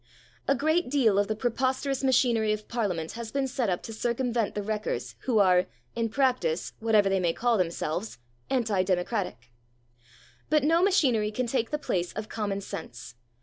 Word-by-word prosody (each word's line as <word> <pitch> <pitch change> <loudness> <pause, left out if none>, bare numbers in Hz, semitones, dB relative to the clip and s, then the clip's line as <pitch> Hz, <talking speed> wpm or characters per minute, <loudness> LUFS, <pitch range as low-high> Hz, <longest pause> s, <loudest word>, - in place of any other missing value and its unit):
A 275 - +4
great 315 +3 +1
deal 235 -8 +3
of 205 - +2
the 215 - -1
preposterous 260 +3 -1
machinery 240 -4 +3
of 215 0 -6
Parliament 185 -9 -2
has 230 -1 -7
been 275 -1 0
set 250 -4 -1
up 180 - -1
to 225 - -7
circumvent 235 0 -1
the 205 - -2
wreckers, 215 +1 -3
who 245 -4 +2
are, 185 -3 +4 0.3
in 230 -1 0
practice, 245 - 0
whatever 220 -3 +3
they 195 0 +2
may 170 -2 +1
call 240 +3 +1
themselves, 180 +1 -2 0.3
anti 225 -7 +1
democratic. 180 - -2 1.0
But 305 -1 +3
no 330 +3 +4
machinery 270 - +3
can 250 +4 -2
take 235 -1 -1
the 300 - -1
place 180 -11 -2
of 215 0 -5
common 200 -3 -2
sense. 120 - -8
225 Hz, 170 wpm, -27 LUFS, 195-255 Hz, 1.0 s, A